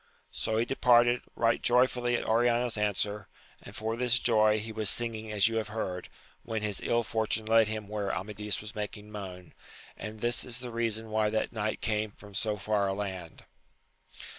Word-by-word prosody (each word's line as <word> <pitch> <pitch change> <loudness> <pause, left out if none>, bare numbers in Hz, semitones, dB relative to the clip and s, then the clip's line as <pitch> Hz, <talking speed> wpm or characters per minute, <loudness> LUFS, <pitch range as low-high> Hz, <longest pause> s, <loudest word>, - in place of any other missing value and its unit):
So 110 - -1
he 115 - +2
departed, 120 -1 +4
right 115 0 +2
joyful 125 0 +3
at 120 -1 +1
Oriana's 120 +1 +2
answer, 105 -1 0 0.3
and - - -12
for 110 +1 -2
this 120 0 +2
joy 110 -2 +4
he 110 +1 -4
was 110 -2 -1
singing 110 -2 -2
as 105 0 +4
you 115 0 -1
have 110 -2 -1
heard, 95 -5 -4 0.3
when 110 -1 -3
his 105 -2 -1
ill 120 0 +1
fortune 110 0 0
led 110 0 +5
him 110 -1 -4
where 105 -2 -2
Amadis 105 +1 -2
was 105 0 -8
making 105 0 -6
moan; 90 -4 -8 0.4
and 110 0 -7
this 120 +2 0
is 120 -2 -3
the 125 -1 -6
reason 115 -1 -1
why 110 -1 +2
that 110 +2 -1
knight 110 -1 -2
came 110 -1 0
from 100 0 -15
so 105 +1 0
far 100 +1 +1
a 95 - 0
land. 95 -5 -5
110 Hz, 185 wpm, -30 LUFS, 105-115 Hz, 0.4 s, led